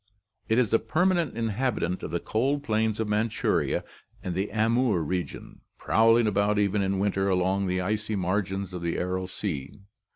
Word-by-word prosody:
It 110 - +3
is 115 -4 +2
a 115 - +5
permanent 170 +2 +1
inhabitant 110 -5 -1
of - - -5
the 85 +1 -1
cold 135 +9 0
plains 110 -2 0
of 110 - 0
Manchuria 105 +1 0 0.4
and 90 - -3
the 95 +3 -1
Amoor 110 -3 +2
region... 90 +2 -5 0.2
prowling 115 +1 +4
about 105 0 +1
even 100 0 +2
in 95 0 0
winter 100 0 +1
along 95 +1 +1
the 90 0 0
icy 105 +3 -2
margins 95 0 -2
of 90 - -5
the 85 0 -2
Aral 90 +1 -2
sea." 75 -8 -5
105 Hz, 165 wpm, -27 LUFS, 95-110 Hz, 0.4 s, a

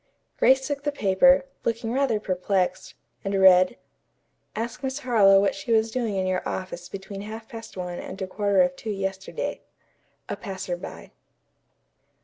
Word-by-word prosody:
Grace 265 0 +5
took 285 -1 -3
the 290 - 0
paper, 270 +4 +4 0.2
looking 230 0 -1
rather 260 -5 +1
perplexed, 185 -1 -1 0.3
and 195 0 -1
read: 185 +3 +6 0.8
"Ask 230 +2 -4
Miss 265 0 -2
Harlowe 215 -8 +5
what 200 0 +2
she 195 +4 -6
was 220 0 +3
doing 230 -5 -1
in 190 -1 0
your 185 0 0
office 185 -1 -5
between 195 0 -7
half 220 +2 -8
past 225 -3 -10
one 180 -1 -4
and - - -8
a 190 - -2
quarter 200 0 +2
of 180 0 -1
two 220 - -7
yesterday." 195 - -3 0.7
"A - - -3
PASSERBY." 190 -3 -6
200 Hz, 150 wpm, -25 LUFS, 190-230 Hz, 0.8 s, read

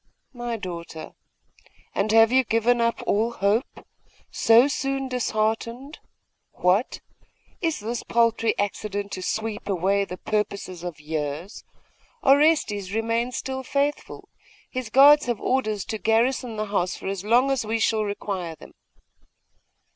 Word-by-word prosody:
'My 240 -2 -4
daughter! 170 -5 -7 0.8
And 205 +2 0
have 225 +1 +6
you 260 +1 +4
given 235 +1 +2
up 230 0 0
all 225 +3 +1
hope? 210 +6 -1 0.5
So 230 +4 +5
soon 270 -1 -2
disheartened! 235 +3 -2 0.5
What! 185 +7 +1 0.6
Is 325 - -1
this 230 +2 -3
paltry 230 -1 +1
accident 205 0 -3
to 185 - -5
sweep 215 +1 -3
away 195 +2 +1
the 180 - -7
purposes 200 -4 -3
of 175 -4 -6
years? 150 +4 -5 0.6
Orestes 270 - +3
remains 230 +3 -1
still 265 0 -4
faithful. 280 +2 -2 0.4
His 255 -4 -4
guards 285 +3 +7
have 240 -4 -1
orders 215 -7 -1
to 220 - -4
garrison 230 +2 +1
the 215 0 -2
house 190 -3 -1
for - - -11
as 195 -1 -3
long 245 +6 +3
as 270 -3 0
we 220 +1 -1
shall 225 -1 +1
require 195 -5 -4
them. - - -14
225 Hz, 130 wpm, -24 LUFS, 200-245 Hz, 0.8 s, guards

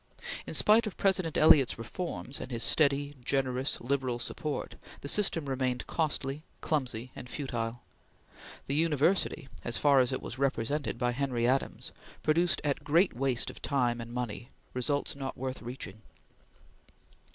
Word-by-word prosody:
In - - -2
spite 220 +2 +5
of 205 - -6
President 185 -5 +1
Eliot's 145 -4 +6
reforms 135 +3 -4
and 130 - -6
his 115 -1 +1
steady, 145 -1 +3
generous, 130 0 0
liberal 130 -1 -1
support, 145 +5 -4 0.3
the - - -6
system 170 -3 +3
remained 130 -2 -1
costly, 145 -3 -1 0.2
clumsy 130 -5 -2
and 125 - -9
futile. 120 -4 -4 0.8
The 140 - -1
university 160 0 +1 0.2
as 120 - +2
far 140 -2 +5
as 125 0 +3
it 130 - -1
was 130 - -6
represented 140 0 -1
by 120 0 +1
Henry 125 -2 0
Adams 135 +2 -1 0.3
produced 170 +3 +3
at 145 -2 -1
great 170 - +3
waste 130 -1 0
of - - -14
time 120 -4 0
and 115 0 -8
money 120 0 -4 0.2
results 140 +4 -1
not 135 -1 -5
worth 130 +1 -4
reaching. 115 -4 -7
135 Hz, 145 wpm, -30 LUFS, 125-150 Hz, 0.8 s, Eliot's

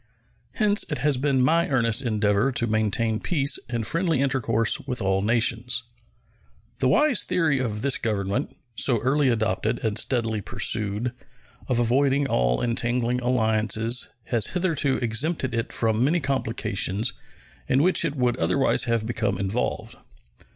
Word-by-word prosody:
Hence 210 -2 +1
it 150 - -2
has 140 +1 +1
been 135 -1 +1
my 165 +5 +2
earnest 115 -4 +1
endeavor 105 0 +1
to 120 - +1
maintain 110 0 0
peace 140 -5 0
and 120 -2 -2
friendly 165 - 0
intercourse 130 -5 +1
with 125 -1 -5
all 95 -2 0
nations. 115 +2 +1 1.0
The 130 - +2
wise 255 - +3
theory 155 -6 +1
of 110 -4 -3
this 140 -2 +1
Government, 105 +3 -2 0.2
so 125 0 +2
early 135 +2 +2
adopted 110 0 0
and 105 -2 0
steadily 115 -4 -1
pursued, 105 +4 0 0.6
of 125 - 0
avoiding 135 +4 +2
all - - 0
entangling 120 +1 -1
alliances 115 -1 +1
has 115 -2 0
hitherto 155 -7 +1
exempted 130 +4 -1
it 115 0 -2
from 110 0 0
many 160 +6 +2
complications 115 - 0 0.6
in 135 +3 +3
which 185 0 +3
it 155 -3 -2
would 125 -3 0
otherwise 90 +14 +1
have 115 -2 0
become 110 -4 -1
involved. 100 +5 -3
120 Hz, 140 wpm, -24 LUFS, 110-135 Hz, 1.0 s, wise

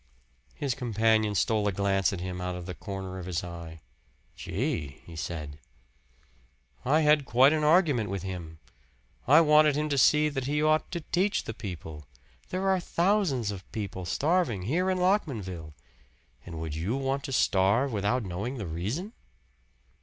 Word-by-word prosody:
His 140 -3 -1
companion 110 -3 +1
stole 105 0 +1
a - - +2
glance 95 0 +1
at 95 -3 -5
him 90 0 -5
out 90 0 -3
of 90 -1 -7
the 90 - -5
corner 95 0 -6
of 90 - -7
his 90 -2 -2
eye. 85 -2 -8 0.5
"Gee!" 85 - -3
he 85 - -11
said. 75 -2 -5 1.2
"I 150 +5 +3
had 150 -1 +4
quite 130 +3 +5
an 155 -1 0
argument 150 - +3
with 95 -1 -4
him. 85 -4 -6 0.7
I 150 +6 +7
wanted 150 -2 +5
him 150 +1 -1
to 140 -2 +1
see 150 +4 +5
that 135 -3 -3
he 145 +2 0
ought 155 +1 +2
to 170 -2 -4
teach 190 +6 0
the 110 - -5
people. 80 - -8 0.4
There 185 +1 -2
are 190 -1 +3
thousands 170 - +1
of 95 -2 -9
people 95 -4 -5
starving 145 - 0
here 170 - 0
in 185 - +1
Lockmanville; 110 - -1 0.7
and 85 -2 -6
would 80 -2 -4
you 85 - -2
want 135 0 -1
to - - -5
starve 110 +3 +2
without 105 +4 0
knowing 100 +8 -4
the 105 - -4
reason?" 105 - -4
110 Hz, 165 wpm, -28 LUFS, 90-150 Hz, 1.2 s, I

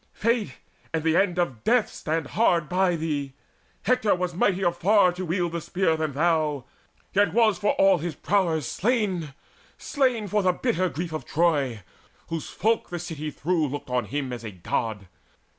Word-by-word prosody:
Fate 230 -1 0 0.4
and 160 - -1
the 160 0 +2
end 180 -1 +2
of 135 -11 -1
death 235 -1 +3
stand 160 -1 -2
hard 175 -8 +2
by 180 0 +2
thee! 150 -4 -3 0.5
Hector 250 -4 +2
was 180 -1 -2
mightier 185 0 +2
far 185 +2 +4
to 180 +1 -6
wield 175 0 -1
the 170 0 -3
spear 175 -1 0
Than 155 -2 -2
thou, 155 -3 +1 0.5
yet 195 -4 +3
was 220 -5 +3
for 205 - +2
all 195 -2 +4
his 165 -1 -4
prowess 170 -8 0
slain, 190 - -1 0.4
Slain 255 -7 0
for 210 +2 +1
the 185 -1 +2
bitter 185 -4 0
grief 165 +1 -5
of 155 - -4
Troy, 140 - +1 0.5
whose 165 -2 -4
folk 225 +1 0
The 175 - -4
city 155 -2 -5
through 160 +1 0
looked 140 -1 -6
on 125 -2 0
him 135 +2 -3
as 120 -2 -7
a 110 - -5
God. 100 +2 -3
170 Hz, 175 wpm, -25 LUFS, 150-195 Hz, 0.5 s, far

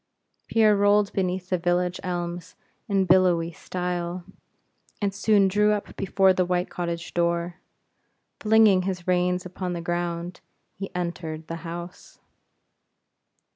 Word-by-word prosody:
Pierre 215 -2 +4
rolled 205 0 +3
beneath 185 -1 -2
the 185 - +1
village 175 +1 0
elms 175 -1 -4 0.3
in 195 -1 +2
billowy 175 -2 +3
style, 180 0 -4 0.8
and 200 -2 -1
soon 200 -1 +3
drew 210 +2 +3
up 205 - -5
before 195 -1 +3
the 185 - +1
white 180 0 -1
cottage 170 -1 -4
door. 170 0 0 0.8
Flinging 215 -3 +5
his 180 -2 -4
reins 180 0 +1
upon 180 0 -4
the 170 - -4
ground 175 0 -3 0.3
he 195 0 -6
entered 170 -3 -4
the 165 +1 -5
house. 170 +2 -8
180 Hz, 125 wpm, -25 LUFS, 175-195 Hz, 0.8 s, Flinging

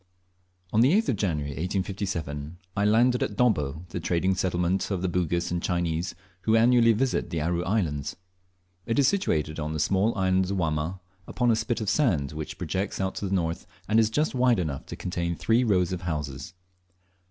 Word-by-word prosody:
On 110 - +4
the 130 +7 +5
8th 225 - -2
of 125 - +2
January, 75 -8 -1
1857, 90 -3 -3 0.2
I 100 - +1
landed 120 +4 +4
at - - -1
Dobbo, 80 - +1
the - - -4
trading 90 +3 +1
settlement 90 0 0
of 95 -3 -2
the - - +1
Bugis 85 -1 -1
and 85 -1 -1
Chinese, 85 -1 -1 0.3
who 110 +3 +2
annually 115 0 +5
visit 125 +4 0
the 85 - -2
Aru 85 +3 0
Islands. 85 -8 -1 0.7
It 115 - 0
is 140 -2 +5
situated 80 - 0
on 75 0 -3
the 80 - -3
small 100 +8 +1
island 95 0 +2
of 100 - -1
Wamma, 80 +1 -1 0.3
upon 120 -1 +1
a - - +4
spit 115 +1 -1
of 110 - -3
sand 85 - +1
which 75 0 -6
projects 95 +3 -3
out 95 0 -1
to 100 - -2
the 95 - 0
north, 85 -2 -2 0.2
and 110 - +4
is 110 -1 +4
just 150 +7 0
wide 125 -2 +3
enough 75 -7 -3
to - - -6
contain 85 -1 -3
three 115 +8 +2
rows 95 -6 +2
of 90 -2 -3
houses. 75 -2 -4
90 Hz, 190 wpm, -26 LUFS, 80-110 Hz, 0.7 s, the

